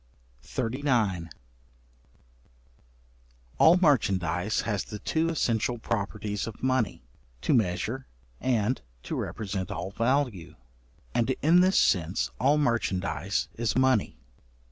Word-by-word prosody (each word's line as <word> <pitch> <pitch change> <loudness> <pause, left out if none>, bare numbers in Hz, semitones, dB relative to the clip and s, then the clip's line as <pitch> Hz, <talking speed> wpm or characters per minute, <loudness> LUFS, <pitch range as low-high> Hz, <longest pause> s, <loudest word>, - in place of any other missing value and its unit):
§39. 115 - -1 2.3
All 170 +3 +7
merchandize 100 - +2
has 105 -5 -1
the 105 - -7
two 160 +9 0
essential 120 -6 0
properties 105 -1 -3
of 115 - -9
money, 130 -4 0 0.4
to - - +1
measure 110 +3 0 0.3
and 125 -1 0 0.2
to - - -5
represent 95 -3 -4
all 95 - -4
value: 115 - 0 0.6
and 120 +1 +1
in 165 +4 +6
this 185 +1 +4
sense 90 +3 +1
all 140 +4 +4
merchandize 100 - 0
is 115 -2 -1
money. 130 - +2
115 Hz, 100 wpm, -27 LUFS, 100-130 Hz, 2.3 s, All